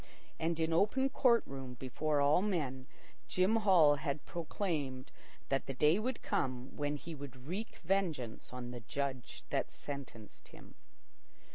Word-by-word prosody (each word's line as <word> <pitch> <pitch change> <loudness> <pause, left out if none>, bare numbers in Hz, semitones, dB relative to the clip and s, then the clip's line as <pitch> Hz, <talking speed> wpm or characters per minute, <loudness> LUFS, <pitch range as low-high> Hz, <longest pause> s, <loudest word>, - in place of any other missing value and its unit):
And 165 0 0
in 160 0 +1
open 240 +10 +3
court 240 -3 +4
room, 135 -2 -7
before 145 +4 0
all 145 +5 +5
men, 145 -10 -1 0.4
Jim 190 +5 +3
Hall 175 -9 +6
had 145 0 -3
proclaimed 155 -7 -3 0.4
that 135 0 0
the 135 - -3
day 150 +8 +5
would 250 +3 -2
come 130 0 -1
when 145 0 -1
he 165 +3 -7
would 135 -4 -9
wreak 195 +9 -4
vengeance 160 - -1
on 125 -1 -6
the 125 - -6
Judge 130 +2 -4
that - - +1
sentenced 130 -7 -8
him. - - -14
145 Hz, 145 wpm, -35 LUFS, 130-180 Hz, 0.4 s, Hall